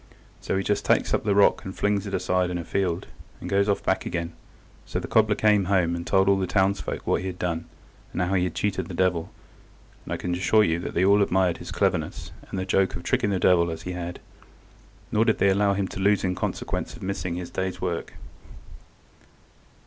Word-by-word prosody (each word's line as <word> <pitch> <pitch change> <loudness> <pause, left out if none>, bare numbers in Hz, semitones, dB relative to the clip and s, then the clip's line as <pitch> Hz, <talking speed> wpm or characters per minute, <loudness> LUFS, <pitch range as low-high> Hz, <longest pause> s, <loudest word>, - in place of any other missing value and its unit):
So - - -2
he 95 - 0
just 105 +1 0
takes - - +2
up - - +1
the 100 -2 +2
rock 100 - +4
and 95 - -7
flings 100 0 0
it 100 - -6
aside 90 0 +1
in 90 - -2
a 85 - -4
field, 90 -1 -1 0.3
and - - -7
goes 100 +1 +2
off 100 - 0
back - - +1
again. 85 0 -3 0.5
So - - -3
the - - -6
cobbler 110 -1 +3
came 105 -2 +3
home, 90 -3 +2
and 85 0 -6
told 95 -1 +3
all 100 0 +4
the 95 - -1
townsfolk 100 +1 0
what - - +1
he 95 - -4
had 90 -1 -5
done, 85 -2 -2 0.5
and - - -4
how 90 +2 -1
he 90 -2 +2
had 90 - -4
cheated 95 -4 -1
the 90 - -7
devil, 90 -2 +1 0.7
and - - -9
I - - -1
can 90 - -3
assure 100 +4 +3
you 85 -4 +1
that 85 - -6
they 90 - +3
all 100 +1 +5
admired 95 -3 +2
his - - -9
cleverness, - - -1 0.2
and - - -5
the 95 - -2
joke 95 0 +1
of 85 - -6
tricking 105 - +1
the 100 - +1
devil 85 -1 +4
as 80 -1 -6
he 90 - -4
had, 90 -1 -5 0.9
nor 110 - +3
did 110 -1 +2
they 100 - +3
allow 100 +1 +2
him 95 -1 -1
to - - -7
lose 100 +1 +3
in 90 -1 +1
consequence - - -3
of - - -11
missing 95 -2 -3
his 90 0 -6
day's 95 0 -3
work. 85 -1 -3
95 Hz, 225 wpm, -25 LUFS, 90-100 Hz, 0.9 s, all